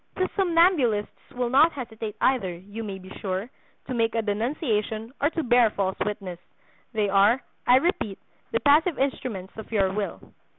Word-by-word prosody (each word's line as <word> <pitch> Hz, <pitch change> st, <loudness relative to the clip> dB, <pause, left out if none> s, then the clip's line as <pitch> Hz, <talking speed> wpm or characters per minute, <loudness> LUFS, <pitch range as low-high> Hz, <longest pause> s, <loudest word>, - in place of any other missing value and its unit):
These 370 Hz, -, +1 dB
somnambulists 330 Hz, -, +3 dB, 0.2 s
will 245 Hz, -1 st, -1 dB
not 305 Hz, +5 st, +5 dB
hesitate 225 Hz, -5 st, -6 dB
either, 245 Hz, -9 st, +2 dB
you 200 Hz, +6 st, -8 dB
may 200 Hz, -3 st, -5 dB
be 190 Hz, 0 st, -13 dB
sure, 195 Hz, +5 st, -3 dB, 0.3 s
to 255 Hz, -, -4 dB
make 230 Hz, -1 st, +1 dB
a 225 Hz, -, +1 dB
denunciation, 220 Hz, -, -2 dB
or 290 Hz, -, +3 dB
to 325 Hz, -1 st, -3 dB
bear 240 Hz, -2 st, +5 dB
false 190 Hz, -2 st, -1 dB
witness; 195 Hz, -4 st, -5 dB, 0.5 s
they 215 Hz, -3 st, 0 dB
are, 200 Hz, +6 st, +4 dB, 0.2 s
I 245 Hz, -, +7 dB
repeat, 260 Hz, -, +1 dB, 0.3 s
the 230 Hz, -, 0 dB
passive 300 Hz, +5 st, +4 dB
instruments 250 Hz, -8 st, -3 dB
of 220 Hz, -, -9 dB
your 195 Hz, -3 st, +2 dB
will. 205 Hz, 0 st, -3 dB
225 Hz, 165 wpm, -25 LUFS, 205-265 Hz, 0.5 s, I